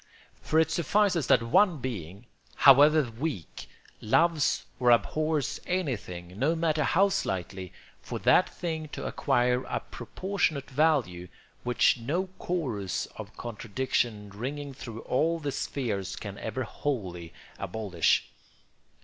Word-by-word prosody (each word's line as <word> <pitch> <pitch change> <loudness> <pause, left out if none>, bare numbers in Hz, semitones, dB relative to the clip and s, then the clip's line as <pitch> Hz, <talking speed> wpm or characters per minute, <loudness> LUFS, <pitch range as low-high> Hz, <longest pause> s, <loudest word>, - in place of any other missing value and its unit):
For 160 - +2
it 160 0 +2
suffices 180 -1 +2
that - - +4
one 170 - +4
being, 105 - -6 0.3
however 145 +3 +7
weak, 115 - -5 0.3
loves 160 +6 +2
or 125 -1 +3
abhors 155 +4 +1
anything, 100 - -3
no 155 +6 +2
matter 160 -2 +1
how 195 +4 +3
slightly, 95 - -3 0.3
for - - -5
that - - +4
thing 160 -3 -4
to - - -5
acquire 125 -2 +1
a - - -2
proportionate 170 -8 -3
value 130 - +1 0.3
which 125 0 +3
no 170 +11 -2
chorus 120 - -2
of - - -9
contradiction 115 -2 -2
ringing 140 +7 -5
through 115 -3 -8
all 165 +6 +1
the 145 -3 -3
spheres 105 -10 -3
can 100 -2 -7
ever 120 +4 -3
wholly 95 - -4 0.3
abolish. 95 -4 0
130 Hz, 120 wpm, -28 LUFS, 105-160 Hz, 0.3 s, however